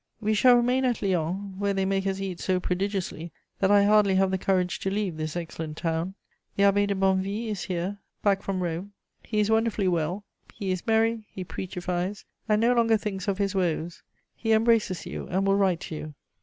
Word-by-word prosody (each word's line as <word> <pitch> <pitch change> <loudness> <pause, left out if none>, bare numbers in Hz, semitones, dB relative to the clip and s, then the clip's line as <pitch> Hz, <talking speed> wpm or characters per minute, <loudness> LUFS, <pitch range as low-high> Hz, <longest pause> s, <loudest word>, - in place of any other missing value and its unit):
We 215 -1 0
shall 245 +3 +6
remain 250 +2 +2
at 245 -4 0
Lyons, 190 +1 -1
where 200 -1 0
they 195 0 +1
make 195 0 0
us 195 0 -1
eat 190 -3 -4
so 185 -1 +1
prodigiously 180 -3 -2 0.3
that 195 - +3
I 205 0 +6
hardly 205 -1 +4
have 190 0 +3
the 190 - 0
courage 185 -2 0
to 195 - -1
leave 195 -3 -1
this 155 0 -4
excellent 160 -2 -5
town. 165 +2 -2 0.4
The 200 - +2
Abbé 200 0 +4
de 200 - 0
Bonnevie 195 +3 0
is 205 -3 -3
here, 185 +3 -3 0.2
back 200 -2 +3
from 190 -2 -2
Rome; 175 +4 -4 0.3
he 215 - -2
is 210 +1 +2
wonderfully 220 -3 +2
well; 175 +3 -1 0.3
he 195 -3 -3
is 185 +3 -3
merry, 225 -1 +2
he 185 - -7
preachifies, 180 +2 -4 0.2
and 210 0 +4
no 235 +2 +4
longer 230 -2 +4
thinks 200 -2 -4
of 195 -2 0
his 200 -1 0
woes; 175 -3 -1 0.3
he 225 -1 0
embraces 220 -5 +2
you 180 - -6
and 190 +2 0
will 195 0 +3
write 190 -4 +2
to 160 - -6
you. 155 0 -7
195 Hz, 205 wpm, -26 LUFS, 180-210 Hz, 0.4 s, shall